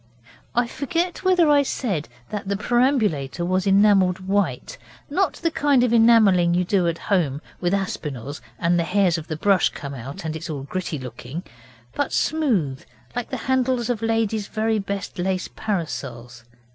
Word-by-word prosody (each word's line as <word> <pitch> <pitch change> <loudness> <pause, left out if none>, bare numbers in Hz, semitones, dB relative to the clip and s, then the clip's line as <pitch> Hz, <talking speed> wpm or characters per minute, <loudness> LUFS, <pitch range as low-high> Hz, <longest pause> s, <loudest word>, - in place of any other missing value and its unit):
I 240 +1 +3
forget 335 +9 -2
whether 365 -3 +4
I 290 -1 +5
said 205 - -2 0.2
that 205 -2 -4
the 200 0 0
perambulator 210 - +1
was 185 +2 0
enamelled 195 -2 +4
white 200 +1 -1 0.3
not 375 +5 +1
the 330 - -2
kind 285 -5 +3
of 240 -2 +2
enamelling 215 -7 +5
you 180 - +2
do 185 -2 +2
at 170 -1 -1
home 160 -10 0 0.2
with 175 -1 0
Aspinall's 145 - -3 0.2
and 170 +6 +2
the - - +2
hairs 180 -1 +2
of 160 - -10
the 155 - -4
brush 195 +2 +3
come 140 -1 -7
out 135 +5 -7
and 160 0 -3
it 160 +1 -6
is 140 -3 -4
gritty 180 -1 -3
looking, 130 +5 -7 0.5
but 285 - -1
smooth, 215 - 0 0.3
like 245 -1 -3
the - - -3
handles 255 -2 +1
of 230 -3 -3
ladies 225 -2 0
very 220 0 0
best 200 -2 -5
lace 185 0 -1
parasols. 125 - -4
195 Hz, 165 wpm, -23 LUFS, 165-235 Hz, 0.5 s, I